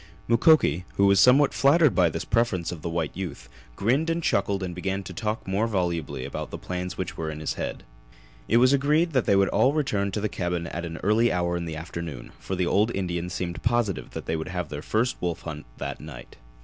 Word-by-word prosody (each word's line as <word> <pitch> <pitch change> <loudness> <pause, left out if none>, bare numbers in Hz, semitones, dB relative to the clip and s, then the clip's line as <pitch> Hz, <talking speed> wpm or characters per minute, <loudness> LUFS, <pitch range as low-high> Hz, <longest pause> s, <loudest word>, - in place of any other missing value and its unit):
Mukoki, 115 - +4
who 100 - +4
was 100 -1 +5
somewhat 135 +3 +6
flattered 150 +1 +4
by 90 -3 +4
this 80 +1 -4
preference 95 -8 0
of 85 -3 -7
the 85 - -3
white 80 -2 -2
youth, 80 -10 -6 0.3
grinned 135 - +1
and 165 0 -1
chuckled 100 -4 +1
and 90 -1 -4
began 95 +2 -3
to - - -8
talk 110 -2 -3
more 100 +4 +1
volubly 85 - -2
about - - -5
the - - -6
plans 90 0 -5
which 95 - -4
were 80 -1 -3
in 75 -1 -6
his 75 - -2
head. - - -5 0.6
It 115 - +4
was 130 +3 +5
agreed 150 +5 +2
that 130 -3 +2
they 100 - +4
all 100 +6 +3
would - - -2
return 105 -9 0
to - - -1
the 105 - 0
cabin 90 -3 -2
at 85 +1 -5
an 85 -1 -6
early 110 +4 +3
hour 85 -1 0
in 85 -1 -3
the 80 -1 -5
afternoon, 80 -5 -7
for 95 - -4
the 90 -1 0
old 105 +5 +2
Indian 90 -2 -2
seemed 90 -1 -4
positive 115 -5 0
that - - -5
they 80 - -1
would 80 0 -4
have 90 -3 -3
their 75 -1 -5
first 115 +9 0
wolf 85 -1 -2
hunt 75 -4 -7
that - - -5
night. 75 -6 -10
95 Hz, 225 wpm, -26 LUFS, 85-115 Hz, 0.6 s, somewhat